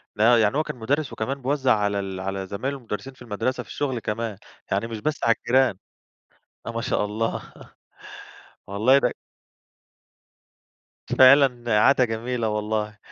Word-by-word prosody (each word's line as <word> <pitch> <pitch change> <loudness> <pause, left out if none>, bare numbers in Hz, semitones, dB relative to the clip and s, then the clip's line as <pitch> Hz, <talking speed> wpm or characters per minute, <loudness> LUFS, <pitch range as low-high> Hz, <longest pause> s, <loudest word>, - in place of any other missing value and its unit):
لا 115 +2 +5
يعني 110 +5 +2
هو 155 - +2
كان - - -6
مدرّس، 135 +5 -2
وكمان 135 +5 -3
بيوزع 130 -3 +2
على 100 -1 0
ال 95 -1 -5
على 95 0 -4
زمايل 130 +9 -3
له 140 - -7
المدرّسين 120 +2 -6
في 130 - -23
المدرسة 120 +3 -3
في - - -21
الشغل 130 -4 -2
كمان، 110 -1 -4 0.3
يعني 100 +4 0
مش 115 -2 -6
بس 150 +6 -3
على 115 - +4
الجيران! 130 -5 +2 0.9
آه 115 - -4
ما 115 - -3
شاء 115 - 0
الله، 110 +2 -3 1.2
والله 110 +8 +4
ده - - +1 2.0
فعلًا 130 -4 +5
عادة 130 +2 +5
جميلة 115 0 -2
والله، 105 0 -2
115 Hz, 150 wpm, -24 LUFS, 105-130 Hz, 2.0 s, لا